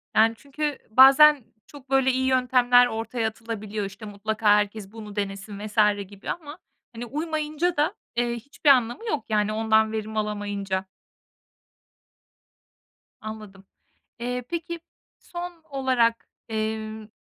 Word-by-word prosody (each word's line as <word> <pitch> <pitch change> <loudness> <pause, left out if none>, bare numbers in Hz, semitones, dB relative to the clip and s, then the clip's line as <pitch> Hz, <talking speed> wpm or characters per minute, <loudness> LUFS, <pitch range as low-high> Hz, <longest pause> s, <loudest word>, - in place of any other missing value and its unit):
Yani, 225 +1 +5
çünkü 290 +1 -3
bazen 270 +4 +7 0.2
çok 275 -2 -14
böyle 270 -1 +3
iyi 260 +1 0
yöntemler 250 -1 +4
ortaya 225 0 -2
atılabiliyor. 215 -2 -5
İşte, 200 +3 -9
mutlaka 215 +2 -5
herkes 205 -1 +2
bunu 215 -2 -10
denesin 200 0 -4
vs. 215 +1 -10 0.3
gibi 200 +1 -10
ama, 310 -3 -5 0.4
hani, 235 +1 -5
uymayınca 310 +4 -2
da, 305 +6 +2 0.2
eee, 240 0 0
hiçbir 280 +5 -1
anlamı 250 - +3
yok, 300 -10 -2
yani, 210 0 +1
ondan 220 0 +2
verim 220 0 -4
alamayınca. 205 -2 -2 2.4
Anladım. 215 -3 -9 0.5
Eee, 250 +1 -3
peki, 340 0 -4 0.4
son 345 -1 -8
olarak, 255 -4 +1 0.2
emm, 220 0 -3
230 Hz, 120 wpm, -25 LUFS, 215-270 Hz, 2.4 s, bazen